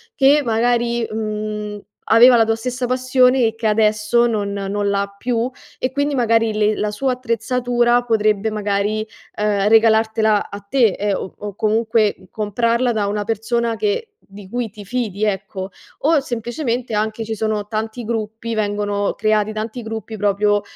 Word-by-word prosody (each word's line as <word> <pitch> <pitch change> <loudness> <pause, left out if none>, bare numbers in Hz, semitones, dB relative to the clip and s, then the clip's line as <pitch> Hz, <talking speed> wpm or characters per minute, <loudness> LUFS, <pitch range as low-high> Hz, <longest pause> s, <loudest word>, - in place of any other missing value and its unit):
che 285 +2 +5
magari, 235 0 +1
mhmm, 210 -1 -4 0.3
aveva 240 +3 +8
la 225 - +4
tua 225 0 +1
stessa 250 +2 -3
passione 255 0 +3
e 220 - -3
che 225 0 -6
adesso 215 +2 +3
non 205 -3 -2
non 200 +1 -2
l'ha 200 0 -2
più 240 +2 -1 0.3
e 255 - -1
quindi 285 +2 0
magari 230 -3 +2
le 210 0 +2
la 210 - -1
sua 255 +5 0
attrezzatura 245 0 +1
potrebbe 215 -2 +1
magari, 210 0 -1 0.3
ehm, 210 -1 0
regalartela 220 -1 +3
a 200 - -6
te 235 +5 +2
e 205 -1 0
o 200 +1 -7
comunque 220 -2 +1
comprarla 230 +4 0
da 210 -3 0
una 205 +1 -1
persona 230 +2 -1
che 435 - -2 0.2
di 195 0 -12
cui 245 -1 -2
ti 205 -1 -11
fidi, 215 -2 -3
ecco. 195 -2 -2 0.3
O 310 +1 +4
semplicemente 240 -1 -3
anche 215 +1 -1
ci 220 - -3
sono 215 -1 -2
tanti 220 +2 -4
gruppi, 225 0 -3
vengono 205 -1 -1
creati 215 0 +1
tanti 220 +3 -4
gruppi 220 0 -6
proprio 205 0 +2
220 Hz, 155 wpm, -19 LUFS, 210-240 Hz, 0.3 s, aveva